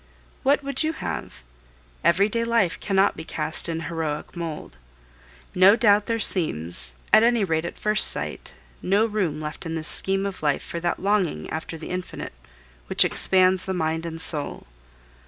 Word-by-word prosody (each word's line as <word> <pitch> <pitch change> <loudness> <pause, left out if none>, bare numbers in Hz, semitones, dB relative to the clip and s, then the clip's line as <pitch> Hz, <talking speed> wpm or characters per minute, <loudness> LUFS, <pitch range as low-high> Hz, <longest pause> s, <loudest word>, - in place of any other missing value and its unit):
What 285 +1 +2
would 280 0 -2
you 315 0 +1
have? 65 - -6 0.6
Everyday 200 +8 +2
life 230 -7 +1
cannot 195 -1 +2
be - - -7
cast 155 +1 -2
in 165 0 -3
heroic 160 0 -4
mould. 160 - -6 0.8
No 190 +3 +6
doubt 210 -3 +3
there 230 -1 0
seems, 85 - 0 0.2
at - - +8
any 235 -1 +3
rate 160 -3 -1
at - - -6
first 210 0 +5
sight, - - -2 0.3
no 200 +4 +2
room 195 -9 -2
left 150 0 -6
in 165 -2 -4
this 160 0 -3
scheme 195 +1 +1
of 195 -2 -5
life 145 -2 0
for 170 - -6
that 175 +1 -2
longing 190 - 0
after 160 +1 -5
the 160 - -8
infinite 180 - -6 0.5
which - - +4
expands 185 0 +3
the 190 - -3
mind 160 0 -2
and 165 0 -7
soul. 150 -4 -5
180 Hz, 165 wpm, -24 LUFS, 160-205 Hz, 0.8 s, at